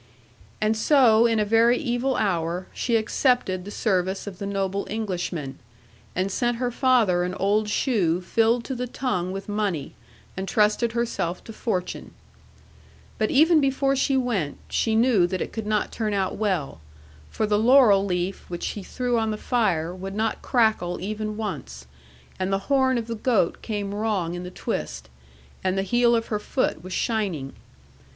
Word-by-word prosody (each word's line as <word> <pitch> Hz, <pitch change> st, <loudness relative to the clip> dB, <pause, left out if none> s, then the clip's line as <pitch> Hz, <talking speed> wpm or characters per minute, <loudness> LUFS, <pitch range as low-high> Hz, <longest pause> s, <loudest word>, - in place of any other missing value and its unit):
'And 215 Hz, +1 st, +1 dB
so, 235 Hz, -2 st, +5 dB
in 225 Hz, -1 st, +1 dB
a 210 Hz, -, +2 dB
very 230 Hz, +3 st, +4 dB
evil 250 Hz, -1 st, -1 dB
hour, 175 Hz, -2 st, -1 dB
she 235 Hz, -, 0 dB
accepted 220 Hz, -4 st, +1 dB
the -, -, -7 dB
service 190 Hz, -3 st, -1 dB
of 195 Hz, -3 st, -8 dB
the 200 Hz, -, -4 dB
noble 195 Hz, 0 st, -2 dB
Englishman, 180 Hz, -9 st, -3 dB, 0.6 s
and 185 Hz, +2 st, 0 dB
sent 240 Hz, +2 st, 0 dB
her 245 Hz, 0 st, -1 dB
father 235 Hz, -9 st, +3 dB
an 180 Hz, +1 st, -2 dB
old 210 Hz, +2 st, +1 dB
shoe 195 Hz, -, +1 dB
filled 225 Hz, +5 st, +1 dB
to 265 Hz, -, -4 dB
the 250 Hz, 0 st, -3 dB
tongue 185 Hz, -8 st, -2 dB
with 195 Hz, +1 st, -6 dB
money, 205 Hz, -8 st, -2 dB, 0.4 s
and 190 Hz, +1 st, -4 dB
trusted 215 Hz, +3 st, +2 dB
herself 230 Hz, -7 st, -2 dB
to 225 Hz, -, -10 dB
fortune. 185 Hz, -5 st, -4 dB, 1.0 s
But 215 Hz, -, +1 dB
even 315 Hz, +3 st, +5 dB
before 275 Hz, 0 st, +1 dB
she 270 Hz, 0 st, +1 dB
went, 215 Hz, -, -1 dB
she 220 Hz, -1 st, +1 dB
knew 225 Hz, -6 st, +4 dB
that 185 Hz, +1 st, -3 dB
it -, -, -4 dB
could 220 Hz, -2 st, -4 dB
not 215 Hz, -1 st, 0 dB
turn 215 Hz, -3 st, -2 dB
out 190 Hz, -1 st, -1 dB
well; 185 Hz, -, -2 dB, 0.5 s
for 220 Hz, -, -1 dB
the 210 Hz, 0 st, +2 dB
laurel 225 Hz, -4 st, +6 dB
leaf 180 Hz, 0 st, -2 dB
which 175 Hz, -1 st, -6 dB
she 205 Hz, -, -3 dB
threw 245 Hz, +4 st, -1 dB
on 220 Hz, 0 st, 0 dB
the 215 Hz, -, -2 dB
fire 185 Hz, -10 st, 0 dB
would 190 Hz, +1 st, -7 dB
not 220 Hz, +1 st, -1 dB
crackle 220 Hz, -8 st, +1 dB
even 215 Hz, +2 st, -4 dB
once, 65 Hz, -, -5 dB, 0.5 s
and 185 Hz, +1 st, -1 dB
the 195 Hz, +7 st, -2 dB
horn 260 Hz, -2 st, +3 dB
of 230 Hz, -, -2 dB
the 230 Hz, -, -4 dB
goat 220 Hz, -5 st, +1 dB
came 205 Hz, -3 st, -3 dB
wrong 205 Hz, -5 st, -1 dB
in 175 Hz, -, -5 dB
the 180 Hz, -, -6 dB
twist, 60 Hz, -, -5 dB, 0.5 s
and 185 Hz, 0 st, 0 dB
the 195 Hz, -, +1 dB
heel 240 Hz, +4 st, +3 dB
of 225 Hz, 0 st, -2 dB
her 210 Hz, -, -1 dB
foot 210 Hz, -, -1 dB
was 185 Hz, -, -8 dB
shining. 185 Hz, -, -2 dB
210 Hz, 175 wpm, -24 LUFS, 185-235 Hz, 1.0 s, laurel